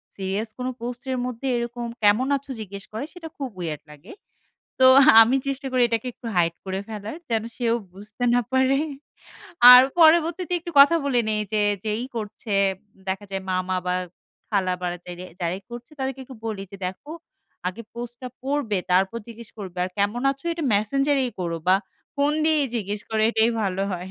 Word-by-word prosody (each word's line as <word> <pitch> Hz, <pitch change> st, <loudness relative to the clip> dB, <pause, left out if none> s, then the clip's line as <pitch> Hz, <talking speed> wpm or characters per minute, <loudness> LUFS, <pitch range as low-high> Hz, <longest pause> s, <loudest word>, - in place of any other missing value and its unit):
Serious 195 Hz, +3 st, -3 dB
কোন 250 Hz, -, -3 dB
post 245 Hz, +1 st, -5 dB
এর 255 Hz, -, -1 dB
মধ্যে, 250 Hz, +2 st, -4 dB
এরকম 235 Hz, 0 st, -4 dB, 0.2 s
কেমন 210 Hz, +6 st, +4 dB
আছো? 275 Hz, 0 st, -11 dB
জিজ্ঞেস 200 Hz, -1 st, -8 dB
করে 225 Hz, +6 st, -3 dB
সেটা 350 Hz, -2 st, -9 dB
খুব 270 Hz, -3 st, -4 dB
weird 155 Hz, -4 st, -4 dB
লাগে। 150 Hz, -, -14 dB, 0.7 s
তো 260 Hz, -, +6 dB, 0.4 s
আমি 240 Hz, +4 st, +4 dB
চেষ্টা 275 Hz, 0 st, -3 dB
করি 255 Hz, -1 st, +2 dB
এটাকে 230 Hz, +2 st, -2 dB
একটু 235 Hz, -, -10 dB
হাইড 170 Hz, -1 st, +2 dB
করে 190 Hz, 0 st, -3 dB
ফেলার 215 Hz, +5 st, -6 dB
যেন 225 Hz, -2 st, 0 dB
সেও 235 Hz, -2 st, +1 dB, 0.2 s
বুঝতে 210 Hz, +5 st, -8 dB
না 245 Hz, -, +4 dB
পারে। 260 Hz, +1 st, +3 dB, 1.0 s
আর 250 Hz, +1 st, +11 dB, 0.2 s
পরবর্তীতে 335 Hz, +2 st, +4 dB
একটু 345 Hz, -, -7 dB
কথা 310 Hz, +4 st, +7 dB
বলে 255 Hz, -4 st, +2 dB
নেই 215 Hz, -1 st, 0 dB
যে 210 Hz, -1 st, +2 dB, 0.2 s
যেই 215 Hz, +3 st, -2 dB
করছে 210 Hz, 0 st, -4 dB, 0.5 s
দেখা 195 Hz, +2 st, -2 dB
যায় 195 Hz, 0 st, -3 dB
মামা 185 Hz, 0 st, -1 dB
বা 180 Hz, -, +1 dB, 0.6 s
খালা 190 Hz, -4 st, +1 dB
বা 180 Hz, -, -2 dB, 0.2 s
যেরেই 180 Hz, +1 st, -8 dB
যারাই 180 Hz, +3 st, -2 dB
করছে 240 Hz, +4 st, -9 dB
তাদেরকে 265 Hz, 0 st, -3 dB
একটু 260 Hz, -1 st, -12 dB
বলি, 205 Hz, -3 st, -3 dB
যে -, -, -7 dB
দেখো 190 Hz, +11 st, -8 dB, 0.6 s
আগে 210 Hz, +6 st, -7 dB
পোস্টটা 240 Hz, +1 st, -7 dB
পড়বে, 270 Hz, -7 st, -1 dB
তারপর 190 Hz, +5 st, +2 dB
জিজ্ঞেস 230 Hz, -1 st, -11 dB
করবে। 185 Hz, -3 st, -7 dB
আর 185 Hz, -, -5 dB
কেমন 210 Hz, +5 st, 0 dB
আছো? 275 Hz, +3 st, -8 dB
এটা 330 Hz, -1 st, -5 dB
মেসেঞ্জার 275 Hz, +7 st, +1 dB
এই 245 Hz, -, -2 dB
করো 170 Hz, -2 st, -2 dB
বা 185 Hz, -, +6 dB, 0.4 s
ফোন 285 Hz, +1 st, +2 dB
দিয়েই 310 Hz, -3 st, +3 dB
জিজ্ঞেস 205 Hz, -1 st, -3 dB
করো 220 Hz, -1 st, 0 dB
এটাই 225 Hz, 0 st, +3 dB
ভালো 195 Hz, -1 st, -1 dB
হয়। 180 Hz, +1 st, -5 dB
225 Hz, 180 wpm, -24 LUFS, 195-260 Hz, 1.0 s, আর